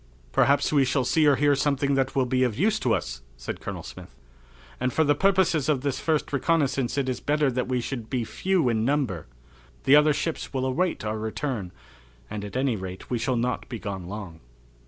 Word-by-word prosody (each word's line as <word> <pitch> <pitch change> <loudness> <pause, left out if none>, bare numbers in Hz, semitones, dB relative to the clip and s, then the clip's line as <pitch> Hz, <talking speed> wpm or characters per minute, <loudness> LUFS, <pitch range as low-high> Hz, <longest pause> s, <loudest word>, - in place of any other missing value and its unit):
"Perhaps 140 - +3
we 140 -2 +5
shall 130 0 +1
see 155 +4 +3
or 145 - +6
hear 145 +1 +3
something 140 0 +1
that 135 0 0
will 135 -2 +3
be 130 +1 0
of 120 -4 +1
use 215 +5 +2
to 125 - 0
us," - - -5 0.2
said - - -6
Colonel - - -5
Smith, - - -11 0.6
"and 125 0 0
for 160 - +2
the 145 -1 +4
purposes 185 -5 +2
of 140 -4 +2
this 140 -1 -1
first 155 -2 0
reconnaissance 140 -4 +1
it 135 -2 0
is 125 -1 -2
better 150 -1 +1
that 125 0 -1
we 125 -1 0
should 120 -3 -5
be 125 -2 -1
few 185 - 0
in 110 -2 +1
number. 125 - 0 0.6
The 135 - +6
other 150 +1 +6
ships 160 +2 -3
will 130 0 0
await 165 +2 0
our 110 0 -2
return, 110 -3 -3 0.6
and 105 - -4
at 105 +4 -5
any 130 -3 +1
rate 95 +1 -7
we 120 - 0
shall 130 +1 0
not 125 +2 -2
be 120 - -4
gone 95 -4 -5
long." 95 -5 -7
130 Hz, 210 wpm, -26 LUFS, 115-145 Hz, 0.6 s, or